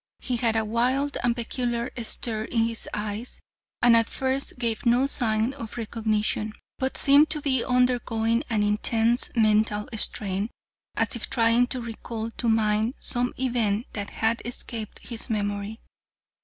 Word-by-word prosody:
He 250 -1 -2
had 230 -1 +1
a 220 0 +1
wild 255 +6 +1
and 240 -1 +2
peculiar 240 0 -2
stare 220 -1 -3
in 230 -1 +1
his 230 0 -3
eyes 210 +3 -4 0.4
and 240 -1 +7
at 230 -1 +4
first 265 0 -2
gave 230 -3 -1
no 245 +2 +4
sign 230 -2 0
of 230 -6 -8
recognition, 215 -1 -1 0.3
but 265 0 -1
seemed 285 +2 +6
to 310 -1 +1
be 265 -4 +2
undergoing 245 -2 +1
an 215 -3 +1
intense" 225 +3 +2
mental 215 -1 +2
strain, 200 0 0 0.5
as - - +1
if 235 - -5
trying 230 +1 +3
to 255 0 -2
recall 230 -1 -5
to 235 - -2
mind 220 +2 +2
some 245 0 0
event 235 -4 0
that 205 -1 -3
had 225 +1 0
escaped 235 -2 -5
his 235 +1 -4
memory. 205 0 -2
230 Hz, 150 wpm, -26 LUFS, 220-245 Hz, 0.5 s, and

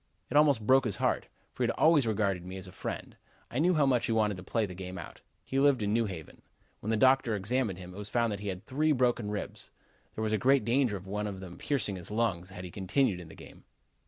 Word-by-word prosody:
It - - -3
almost 145 -7 +4
broke 130 +3 +5
his 105 - 0
heart, - - 0 0.3
for - - -8
he - - +3
had - - -1
always 155 -6 +5
regarded 100 -5 0
me 95 +1 -7
as 95 - -8
a 90 - -10
friend. 90 - -6 0.4
I 125 - -1
knew 175 +3 +3
how 150 -2 +4
much 125 -3 +2
he - - -1
wanted 105 -2 +2
to - - -8
play 110 +3 0
the 95 - -7
game 90 0 -7
out. - - -9 0.2
He 135 - -1
lived 135 -5 +4
in 105 0 0
New 115 0 +2
Haven. 80 -6 -8 0.4
When 105 - -5
the 110 - +2
doctor 130 -1 +4
examined 105 0 0
him, 90 -1 -9
it - - -11
was 105 0 -3
found 115 -2 +1
that 100 - -3
he 105 - -6
had 95 -1 -5
three 155 +3 +2
broken 120 -5 +1
ribs. 105 -1 -5 0.5
There 110 - -2
was 110 0 0
great 135 0 +3
danger 120 -3 +2
of 95 - -12
one 105 +2 -3
of 100 -2 -5
them 90 -2 -10
piercing 105 -9 0
his 90 - -7
lungs 105 -5 -1
had 95 -1 -8
he 90 - -7
continued 100 +2 +1
in 85 - -10
the - - -12
game. - - -14
105 Hz, 260 wpm, -30 LUFS, 95-130 Hz, 0.5 s, broke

